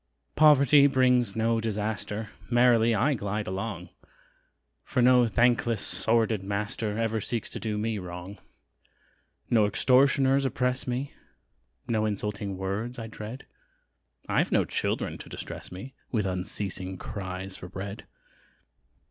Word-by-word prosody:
Poverty 145 Hz, -1 st, +6 dB
brings 125 Hz, -5 st, +2 dB
no 115 Hz, 0 st, +1 dB
disaster! 105 Hz, 0 st, -3 dB, 0.2 s
Merrily 120 Hz, -2 st, +4 dB
I 140 Hz, +7 st, +2 dB
glide 105 Hz, -2 st, -3 dB
along, 95 Hz, -1 st, -4 dB, 0.9 s
For -, -, -2 dB
no 125 Hz, -1 st, +5 dB
thankless, 115 Hz, -1 st, +2 dB
sordid 110 Hz, +2 st, +1 dB
master, 105 Hz, +2 st, -2 dB
Ever 115 Hz, -1 st, 0 dB
seeks 115 Hz, +2 st, -3 dB
to -, -, -5 dB
do 110 Hz, -2 st, -3 dB
me 110 Hz, 0 st, -1 dB
wrong: 90 Hz, +2 st, -8 dB, 1.1 s
No 110 Hz, -3 st, +4 dB
extortioners 135 Hz, +4 st, +3 dB
oppress 125 Hz, -1 st, -1 dB
me, 125 Hz, +3 st, -3 dB, 0.7 s
No 110 Hz, -2 st, +1 dB
insulting 100 Hz, -1 st, -3 dB
words 100 Hz, +6 st, -3 dB
I 115 Hz, -, -5 dB
dread 110 Hz, +3 st, -8 dB, 0.8 s
I've -, -, +1 dB
no -, -, +3 dB
children -, -, -2 dB
to -, -, -10 dB
distress -, -, -7 dB
me 95 Hz, +9 st, -8 dB, 0.2 s
With 110 Hz, -5 st, 0 dB
unceasing 95 Hz, 0 st, -3 dB
cries 95 Hz, -1 st, -6 dB
for 90 Hz, -, -9 dB
bread. 100 Hz, +2 st, -7 dB
110 Hz, 120 wpm, -27 LUFS, 100-125 Hz, 1.1 s, Poverty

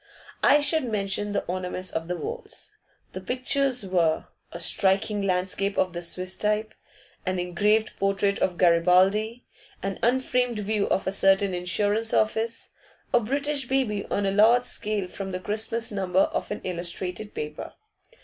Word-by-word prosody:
I 290 Hz, -, +5 dB
should 295 Hz, 0 st, 0 dB
mention 205 Hz, 0 st, -2 dB
the 200 Hz, -, -1 dB
ornaments 185 Hz, +1 st, -3 dB
of 165 Hz, 0 st, -3 dB
the 180 Hz, -, -2 dB
walls. 475 Hz, -, -6 dB, 0.4 s
The -, -, -6 dB
pictures 255 Hz, -1 st, 0 dB
were: 170 Hz, -4 st, +1 dB, 0.2 s
a -, -, -7 dB
striking 200 Hz, +1 st, +2 dB
landscape 195 Hz, +1 st, 0 dB
of 185 Hz, -1 st, +1 dB
the 175 Hz, -, -4 dB
Swiss 185 Hz, +2 st, -2 dB
type, 215 Hz, +1 st, 0 dB, 0.5 s
an 185 Hz, 0 st, -1 dB
engraved 205 Hz, +5 st, +1 dB
portrait 195 Hz, 0 st, +1 dB
of 180 Hz, -2 st, 0 dB
Garibaldi, 185 Hz, +7 st, +3 dB, 0.4 s
an 195 Hz, 0 st, -3 dB
unframed 250 Hz, -1 st, +1 dB
view 210 Hz, 0 st, 0 dB
of -, -, +1 dB
a 190 Hz, -, 0 dB
certain 195 Hz, 0 st, +3 dB
insurance 205 Hz, +5 st, 0 dB
office, 225 Hz, +1 st, 0 dB, 0.4 s
a 245 Hz, -, +6 dB
British 280 Hz, +4 st, -1 dB
baby 240 Hz, -7 st, 0 dB
on 200 Hz, -, 0 dB
a 195 Hz, -, +1 dB
large 225 Hz, +5 st, +5 dB
scale 210 Hz, -5 st, -2 dB
from 190 Hz, +1 st, -6 dB
the 185 Hz, -, -2 dB
Christmas 220 Hz, +4 st, -1 dB
number 190 Hz, -2 st, +1 dB
of -, -, -1 dB
an 210 Hz, -, -4 dB
illustrated 180 Hz, +3 st, -4 dB
paper. 150 Hz, 0 st, -6 dB
200 Hz, 150 wpm, -26 LUFS, 185-225 Hz, 0.5 s, a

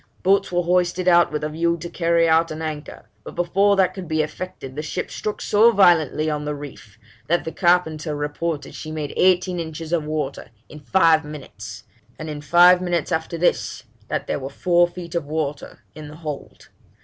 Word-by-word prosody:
Boats 195 Hz, +1 st, +2 dB
were 175 Hz, 0 st, +1 dB
hoisted 180 Hz, +1 st, +1 dB
out 175 Hz, -3 st, +5 dB
with 150 Hz, 0 st, -3 dB
a 150 Hz, -, -1 dB
view 170 Hz, +2 st, 0 dB
to 170 Hz, +1 st, -7 dB
carry 170 Hz, -1 st, +2 dB
out 165 Hz, +1 st, +3 dB
an 155 Hz, 0 st, -6 dB
anchor, 155 Hz, -1 st, -6 dB, 0.2 s
but -, -, -10 dB
before 195 Hz, +4 st, +2 dB
that 190 Hz, -2 st, +2 dB
could 190 Hz, -3 st, -7 dB
be 155 Hz, -1 st, +1 dB
effected 150 Hz, -5 st, -7 dB
the 150 Hz, -, -3 dB
ship 155 Hz, +4 st, -4 dB
struck 210 Hz, -, -4 dB
so 220 Hz, +3 st, +4 dB
violently 170 Hz, -, +3 dB
on 150 Hz, -1 st, -2 dB
the 150 Hz, 0 st, -3 dB
reef, 135 Hz, -7 st, -11 dB, 0.3 s
that 175 Hz, +2 st, +1 dB
the 160 Hz, -, -4 dB
carpenter 160 Hz, -4 st, +1 dB
reported 150 Hz, +1 st, -3 dB
she 155 Hz, -, -7 dB
made 150 Hz, -2 st, -4 dB
eighteen 180 Hz, -1 st, +2 dB
inches 160 Hz, 0 st, -6 dB
of 165 Hz, -3 st, +1 dB
water 150 Hz, -2 st, -4 dB, 0.2 s
in 150 Hz, -, -11 dB
five 165 Hz, 0 st, +3 dB
minutes; 110 Hz, -9 st, -9 dB, 0.3 s
and 155 Hz, 0 st, -6 dB
in 145 Hz, -1 st, -6 dB
five 175 Hz, +4 st, +6 dB
minutes 175 Hz, -4 st, -1 dB
after 160 Hz, +1 st, -2 dB
this, 120 Hz, -7 st, 0 dB, 0.2 s
that -, -, -2 dB
there -, -, -2 dB
were 135 Hz, 0 st, -6 dB
four 175 Hz, +4 st, +2 dB
feet 175 Hz, -1 st, -9 dB
of 170 Hz, -4 st, -2 dB
water 150 Hz, -2 st, -4 dB
in 155 Hz, -1 st, -9 dB
the 150 Hz, -, -11 dB
hold. 155 Hz, -3 st, -8 dB
160 Hz, 195 wpm, -22 LUFS, 150-175 Hz, 0.3 s, five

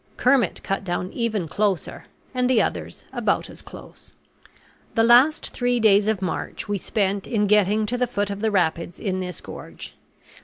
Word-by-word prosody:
Kermit 250 Hz, -6 st, +2 dB
cut 195 Hz, 0 st, -2 dB
down 180 Hz, 0 st, -3 dB
even 220 Hz, -7 st, -1 dB
closer; 200 Hz, +1 st, -2 dB, 0.3 s
and 250 Hz, -1 st, +1 dB
the 250 Hz, -3 st, +4 dB
others -, -, -2 dB
about -, -, 0 dB
as -, -, -10 dB
close. -, -, -13 dB, 0.8 s
The 225 Hz, -, +4 dB
last 250 Hz, +7 st, +5 dB
three 245 Hz, -1 st, 0 dB
days 210 Hz, -2 st, +4 dB
of 215 Hz, -3 st, 0 dB
March 180 Hz, -, -4 dB
we 205 Hz, -1 st, -1 dB
spent 200 Hz, 0 st, -1 dB
in 210 Hz, -3 st, +1 dB
getting 210 Hz, +1 st, +3 dB
to 245 Hz, +3 st, -2 dB
the 250 Hz, -, +2 dB
foot 205 Hz, -4 st, -2 dB
of 200 Hz, 0 st, -5 dB
the 220 Hz, -, +2 dB
rapids 170 Hz, -3 st, 0 dB
in 190 Hz, -3 st, -2 dB
this 180 Hz, -3 st, -5 dB
gorge. -, -, -10 dB
210 Hz, 170 wpm, -23 LUFS, 190-235 Hz, 0.8 s, last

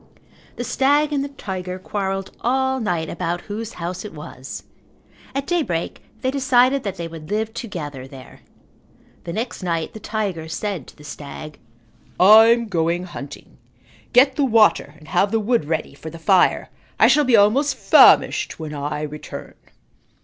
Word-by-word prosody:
The 245 Hz, -, -4 dB
stag 290 Hz, +4 st, +2 dB
and 275 Hz, -1 st, 0 dB
the -, -, -3 dB
tiger 185 Hz, -8 st, -6 dB
quarrelled 195 Hz, 0 st, -4 dB
all 265 Hz, +2 st, +1 dB
night 175 Hz, -8 st, -1 dB
about 175 Hz, +2 st, -3 dB
whose 220 Hz, +2 st, -6 dB
house 175 Hz, +2 st, -5 dB
it 210 Hz, -6 st, -9 dB
was. 135 Hz, -3 st, -9 dB, 0.7 s
At 275 Hz, 0 st, -1 dB
daybreak 280 Hz, -, -2 dB, 0.2 s
they 260 Hz, -, 0 dB
decided 265 Hz, 0 st, +3 dB
that 200 Hz, -4 st, -4 dB
they 170 Hz, -2 st, -5 dB
would 160 Hz, -1 st, -10 dB
live 220 Hz, +1 st, -2 dB
together 150 Hz, -, -6 dB
there. 135 Hz, -1 st, -13 dB, 0.9 s
The 170 Hz, -, -5 dB
next 235 Hz, +5 st, -4 dB
night 165 Hz, -3 st, -2 dB
the 220 Hz, -, -9 dB
tiger 200 Hz, -8 st, -3 dB
said 180 Hz, -, -4 dB
to -, -, -15 dB
the 150 Hz, -, -15 dB
stag, 150 Hz, +1 st, -9 dB, 0.6 s
"I'm 225 Hz, +4 st, +7 dB
going 170 Hz, -2 st, 0 dB
hunting. 145 Hz, -6 st, -10 dB, 0.5 s
Get 260 Hz, +2 st, +5 dB
the 290 Hz, -, +2 dB
water 220 Hz, -, +3 dB
and 155 Hz, -, -17 dB
have 180 Hz, +5 st, +2 dB
the 225 Hz, +2 st, +1 dB
wood 230 Hz, -4 st, +1 dB
ready 155 Hz, -1 st, -3 dB
for 155 Hz, +3 st, -9 dB
the 165 Hz, -, -10 dB
fire. 180 Hz, +3 st, +2 dB, 0.3 s
I -, -, +7 dB
shall 295 Hz, -, +4 dB
be 255 Hz, -4 st, +4 dB
almost 245 Hz, +8 st, +3 dB
famished -, -, +5 dB
when 155 Hz, -2 st, -6 dB
I 145 Hz, +1 st, -4 dB
return." 150 Hz, 0 st, -8 dB
195 Hz, 160 wpm, -21 LUFS, 160-240 Hz, 0.9 s, I'm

